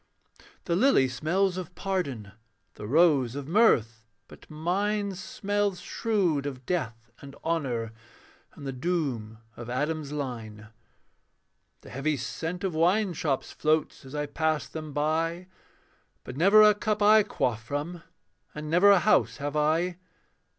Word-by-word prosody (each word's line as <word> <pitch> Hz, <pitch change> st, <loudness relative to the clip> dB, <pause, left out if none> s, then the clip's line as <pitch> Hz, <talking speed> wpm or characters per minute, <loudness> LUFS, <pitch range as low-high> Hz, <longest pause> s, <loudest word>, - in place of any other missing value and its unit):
The 170 Hz, -, 0 dB
lily 195 Hz, -, +4 dB
smells 175 Hz, +9 st, 0 dB
of 180 Hz, -3 st, -7 dB
pardon, 140 Hz, -, -3 dB, 0.4 s
The 105 Hz, -, -8 dB
rose 140 Hz, -3 st, +3 dB
of 140 Hz, -1 st, -6 dB
mirth; 115 Hz, -, +2 dB, 0.2 s
but -, -, -16 dB
mine 200 Hz, +6 st, -1 dB
Smells 200 Hz, +1 st, -2 dB
shrewd 180 Hz, -11 st, -1 dB
of 130 Hz, -2 st, -7 dB
death 120 Hz, -10 st, -3 dB
and 140 Hz, -1 st, -11 dB
honour, 125 Hz, -9 st, -2 dB, 0.6 s
And 140 Hz, -, -10 dB
the 135 Hz, -, -3 dB
doom 130 Hz, -7 st, -2 dB, 0.2 s
of 120 Hz, 0 st, -9 dB
Adam's 150 Hz, +3 st, -2 dB
line. 115 Hz, -7 st, -6 dB, 1.1 s
The -, -, -13 dB
heavy 145 Hz, +3 st, -1 dB
scent 165 Hz, +8 st, -5 dB
of 190 Hz, -3 st, -1 dB
wine 180 Hz, +5 st, +2 dB
shops 145 Hz, -4 st, -2 dB
Floats 155 Hz, 0 st, 0 dB
as 135 Hz, +2 st, -10 dB
I 150 Hz, 0 st, -1 dB
pass 155 Hz, +1 st, -1 dB
them 155 Hz, -1 st, -7 dB
by, 160 Hz, +4 st, -1 dB, 0.8 s
But -, -, -8 dB
never 200 Hz, +8 st, +6 dB
a 210 Hz, 0 st, +7 dB
cup 210 Hz, 0 st, -1 dB
I 215 Hz, +1 st, +7 dB
quaff 115 Hz, -, -2 dB
from, 150 Hz, +7 st, -4 dB, 0.5 s
And 150 Hz, 0 st, -6 dB
never 180 Hz, +4 st, +6 dB
a 200 Hz, -, +7 dB
house 215 Hz, -, +3 dB
have 145 Hz, +1 st, -4 dB
I. 165 Hz, +4 st, +1 dB
155 Hz, 140 wpm, -27 LUFS, 135-180 Hz, 1.1 s, a